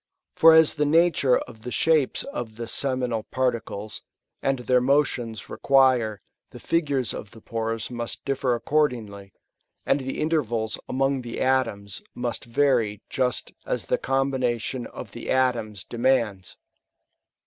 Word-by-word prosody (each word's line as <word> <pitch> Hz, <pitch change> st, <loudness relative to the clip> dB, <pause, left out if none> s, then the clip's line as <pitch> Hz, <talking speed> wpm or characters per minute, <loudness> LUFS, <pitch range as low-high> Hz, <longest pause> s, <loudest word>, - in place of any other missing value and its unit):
For 165 Hz, 0 st, +8 dB
as 160 Hz, -1 st, +6 dB
the 150 Hz, -1 st, 0 dB
na 165 Hz, +4 st, +5 dB
ture 130 Hz, -2 st, +3 dB
of 110 Hz, -, -11 dB
the 125 Hz, -, -6 dB
shapes 155 Hz, +1 st, +2 dB
of 120 Hz, -, -6 dB
the 115 Hz, 0 st, -6 dB
seminal 125 Hz, -3 st, 0 dB
particles^ 115 Hz, -5 st, -2 dB, 0.4 s
and 135 Hz, 0 st, +1 dB
their 125 Hz, 0 st, +2 dB
motions, 125 Hz, -5 st, 0 dB
require, 130 Hz, -6 st, +3 dB, 0.3 s
the -, -, -11 dB
figures 140 Hz, -8 st, 0 dB
of 105 Hz, -, -7 dB
the 115 Hz, -, -14 dB
pores 115 Hz, +1 st, -3 dB
must 120 Hz, -1 st, -5 dB
differ 135 Hz, -2 st, 0 dB
accordingly, 115 Hz, -7 st, -1 dB, 0.5 s
and -, -, +2 dB
the 135 Hz, 0 st, -4 dB
intervals 120 Hz, -9 st, 0 dB
among 135 Hz, 0 st, +1 dB
the 120 Hz, -1 st, -6 dB
atoms 115 Hz, -7 st, 0 dB
must 120 Hz, -1 st, -3 dB
vary 120 Hz, -5 st, +1 dB
just 125 Hz, -2 st, -1 dB
as -, -, -2 dB
the -, -, 0 dB
combina 135 Hz, -2 st, +1 dB
^ -, -, -9 dB
tion 120 Hz, +2 st, -4 dB
of -, -, -9 dB
the -, -, -8 dB
atoms 120 Hz, -6 st, 0 dB
demands. 115 Hz, -6 st, 0 dB
125 Hz, 145 wpm, -25 LUFS, 115-135 Hz, 0.5 s, For